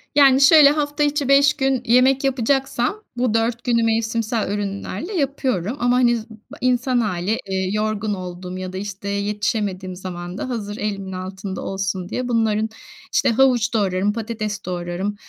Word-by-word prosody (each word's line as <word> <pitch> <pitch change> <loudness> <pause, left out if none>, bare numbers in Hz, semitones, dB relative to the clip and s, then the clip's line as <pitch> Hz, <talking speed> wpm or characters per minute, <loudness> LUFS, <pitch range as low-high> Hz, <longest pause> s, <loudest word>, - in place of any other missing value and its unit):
Yani, 275 -2 +6
şöyle 290 0 +8
hafta 295 0 0
içi 290 -1 0
5 280 +1 +5
gün 270 -2 0
yemek 255 +3 +4
yapacaksam 270 - 0
bu 245 -3 +1
4 225 +1 0
günü 235 -2 +2
mevsimsel 225 -1 0
ürünlerle 205 - -4
yapıyorum. 265 - -1
Ama 245 +1 +2
hani 240 -2 +3
z 220 - -7
ba 220 -1 -14
insan 250 0 +2
hâli, 205 0 -1
eee, 190 -1 -1
yorgun 215 0 -1
olduğum 180 -1 -6
ya 185 0 -6
da, - - -4
işte, 200 0 -5
yetişemediğim 200 -2 -2
zaman 180 0 -7
da 255 - -4
hazır 210 -3 -4
elimin 195 -2 -3
altında 190 +1 -6
olsun 190 -1 -3
diye 250 +1 -3
bunların 220 -2 +1 0.4
işte - - +3
havuç 240 -1 +3
doğrarım 200 -1 +1
patates 215 -2 -4
doğrarım. 180 +3 -3
220 Hz, 155 wpm, -21 LUFS, 195-250 Hz, 0.4 s, şöyle